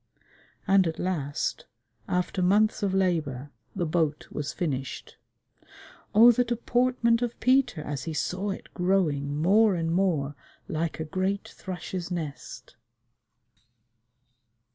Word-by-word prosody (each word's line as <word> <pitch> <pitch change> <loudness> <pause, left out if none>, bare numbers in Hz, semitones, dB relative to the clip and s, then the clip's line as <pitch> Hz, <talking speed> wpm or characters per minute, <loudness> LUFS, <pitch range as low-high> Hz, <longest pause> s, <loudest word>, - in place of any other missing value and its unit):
And 195 -2 +4
at 160 - -3
last, 150 -6 -2 0.4
after 180 +1 -1
months 205 +4 +3
of 200 -2 +1
labor, 155 -8 0 0.2
the 180 -3 -1
boat 155 -2 0
was 150 0 -3
finished. 135 -6 -4 1.0
Oh, 230 +3 +9
the 245 +1 +2
deportment 240 0 +1
of 240 -1 -3
Peter 255 - +2
as 145 -3 -5
he 160 - -3
saw 185 +7 -2
it 195 - -7
growing 165 -7 +1
more 200 +5 +4
and 165 -1 -1
more 165 -7 +1 0.3
like 160 +1 -2
a 160 - -2
great 190 +5 -2
thrush's 180 -1 -6
nest! 145 -8 -6
180 Hz, 120 wpm, -27 LUFS, 155-200 Hz, 1.0 s, Oh